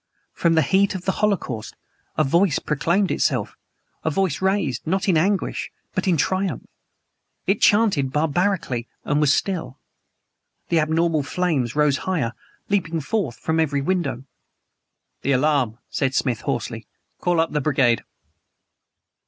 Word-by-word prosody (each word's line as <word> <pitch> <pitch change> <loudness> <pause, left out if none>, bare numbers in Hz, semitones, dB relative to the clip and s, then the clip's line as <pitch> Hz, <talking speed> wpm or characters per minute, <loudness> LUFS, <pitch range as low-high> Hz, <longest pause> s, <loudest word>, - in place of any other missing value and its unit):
From 165 -1 +2
the 160 - +4
heat 190 +7 +2
of 185 - -6
the 190 - +2
holocaust 165 - -1 0.4
a 155 - +4
voice 170 +3 +3
proclaimed 170 +6 0
itself - - 0 0.5
a 160 - +1
voice 185 -1 0
raised, 190 - 0
not 190 +4 0
in 185 - +4
anguish 190 +5 0 0.2
but 185 - -1
in 175 -3 +3
TRIUMPH! 190 +6 0 0.8
It 195 +2 +1
chanted 200 -11 +3
barbarically 150 -4 0 0.2
and 145 0 +1
was 145 -2 +4
still. 160 -8 -1 0.9
The 170 - +3
abnormal 160 0 +1
flames 140 -5 -1
rose 150 -2 +3
higher 150 -11 -1 0.3
leaping 170 -5 0
forth 155 - -2
from 160 0 -1
every 145 -3 +1
window. 170 -6 -1 1.0
"The 140 - +1
alarm!" 130 -4 +2
said 135 -1 0
Smith 125 -4 0
hoarsely. - - -3 0.3
"Call 175 -2 +1
up 165 0 +1
the 150 - 0
brigade!" 130 -5 +2
160 Hz, 135 wpm, -22 LUFS, 140-185 Hz, 1.0 s, the